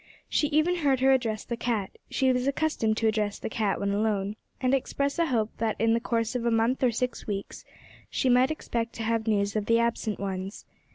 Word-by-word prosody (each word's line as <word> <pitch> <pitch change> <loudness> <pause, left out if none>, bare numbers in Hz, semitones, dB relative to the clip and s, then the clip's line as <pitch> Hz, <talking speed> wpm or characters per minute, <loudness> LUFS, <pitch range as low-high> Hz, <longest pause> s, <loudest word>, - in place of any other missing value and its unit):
She 295 - +1
even 310 +4 +2
heard 280 -5 +2
her 265 0 +5
address 230 -5 +1
the 235 - -3
cat 230 -5 -2 0.2
(she 260 -1 +2
was 250 +1 0
accustomed 275 -7 0
to 225 - +2
address 210 -2 0
the - - -5
cat 210 -3 0
when 200 0 0
alone), 205 -1 0 0.2
and 255 0 +1
express 280 +3 0
a 335 - +3
hope 225 -5 0
that 225 -1 0
in 225 0 +3
the 230 - +2
course 230 -1 -1
of 250 -2 -2
a 235 - +2
month 230 +3 +1
or 255 - +4
six 250 +2 -3
weeks 200 -2 -5
more - - -23
she - - 0
might 250 +1 +5
expect 235 -7 -3
to 225 - -4
have 225 0 0
news 200 -1 +1
of 210 -1 -1
the 230 - +4
absent 235 -2 0
ones. 195 0 -4
230 Hz, 225 wpm, -27 LUFS, 215-255 Hz, 0.2 s, her